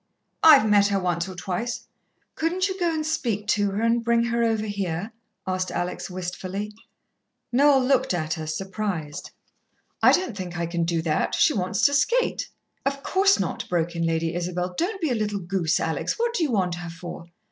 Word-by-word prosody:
"I've 290 -8 +8
met 205 -1 +5
her 200 -1 +1
once 175 0 -1
or 185 - -8
twice." 190 +6 -3 0.5
"Couldn't 360 +4 0
you 380 0 -5
go 345 -2 +2
and 310 -1 -2
speak 235 -10 -1
to 205 -1 +2
her, 200 +3 -2
and 230 0 +2
bring 235 0 +3
her 235 0 0
over 220 -2 +1
here?" 200 -1 -3 0.3
asked 185 0 -1
Alex 175 +2 -3
wistfully. 185 +3 -5 0.8
Noel 270 +1 +5
looked 265 -1 +2
at 160 -3 -1
her, 160 -2 -5
surprised. 185 -3 -4 0.7
"I - - +7
don't 360 - +1
think 180 -3 -5
I 170 - -1
can 170 0 -1
do 165 -1 0
that. 155 -2 0
She - - +4
wants 190 +2 -1
to 285 - +5
skate." 475 - +1 0.3
"Of 275 0 -2
course 390 +1 +3
not," 190 - -3
broke 170 -1 0
in 170 - -1
Lady 165 0 0
Isabel. 180 +1 -2
"Don't 385 - -1
be 315 -5 0
a - - +3
little 210 -3 -1
goose, 175 -3 0
Alex. 160 - -1
What 470 0 0
do 420 - -1
you 315 - +2
want 185 -5 +1
her 175 - -6
for?" 170 0 -8
200 Hz, 190 wpm, -25 LUFS, 175-245 Hz, 0.8 s, I've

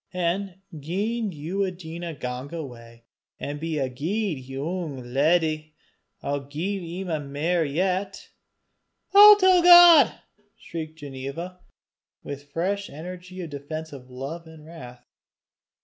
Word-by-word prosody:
An' 180 +2 -2 0.2
gien 205 +8 -2
ye 180 +5 -2
dinna 170 -2 -7
gang 125 +1 -6
awa, 120 -6 -9 0.4
an' 145 +1 -5
be 160 0 -3
a 135 -2 0
guid 165 - -2
yoong 135 -2 -5
leddy, 155 +1 +1 0.5
I'll 140 -1 -3
gie 175 +3 -4
'im 155 -7 -4
mair 165 +4 0
yet." 185 +6 -2 0.8
"I'll 415 +1 +11
tell 375 -2 +5
God," 345 -6 +9 0.5
shrieked 160 -1 -7
Ginevra 145 +6 -7 0.6
with 145 0 -8
fresh 195 +6 -2
energy 180 +4 -9
of 165 -3 -7
defensive 145 -2 -7
love 140 +7 -7
and 160 -1 -14
wrath. 125 -7 -12
160 Hz, 115 wpm, -25 LUFS, 145-185 Hz, 0.8 s, I'll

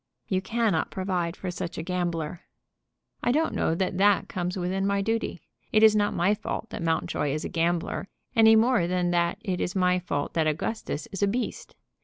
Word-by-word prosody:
"You 185 -1 0
cannot 220 -5 0
provide 180 -3 -2
for 185 - -4
such 170 -1 -5
a 160 - -3
gambler." 175 -2 -2 0.8
"I - - +2
don't 315 +5 +1
know 160 - +1
that 185 +1 -1
that 205 0 +4
comes 180 0 -3
within 190 +2 -1
my 200 0 +1
duty. 225 -4 -2 0.3
It 215 - +4
is 215 -1 +7
not 205 -1 +2
my 185 +4 +3
fault 220 +1 -5
that - - -5
Mountjoy 160 -3 0
is 150 +2 -2
a - - -3
gambler, 170 +3 -1 0.3
any 225 -1 +7
more 225 -5 +3
than 180 0 0
that 170 +1 +1
it 190 -5 -2
is 180 - -2
my 180 -1 +3
fault 145 -5 -3
that 160 -2 +1
Augustus 155 +1 -2
is 195 - -5
a 200 - +4
beast. 240 +5 -3
185 Hz, 195 wpm, -27 LUFS, 170-205 Hz, 0.8 s, is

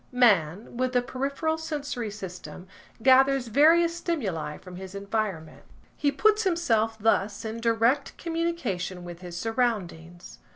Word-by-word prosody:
Man, 210 -4 +2
with 255 0 0
the 245 -1 +2
peripheral 280 +6 -2
sensory 290 -7 -4
system, 180 -4 -9 0.4
gathers 265 -1 +5
various 330 +7 +5
stimuli 210 - -3
from 180 -1 -11
his 190 +1 -9
environment. 200 -5 -3 0.3
He 285 - +1
puts 425 +9 +3
himself 230 - +1
thus 210 -1 0
in 220 +1 -4
direct 230 +4 +1
communication 305 - -3
with 175 0 -9
his 175 -1 -7
surroundings. 185 -7 -3
230 Hz, 125 wpm, -26 LUFS, 190-280 Hz, 0.4 s, gathers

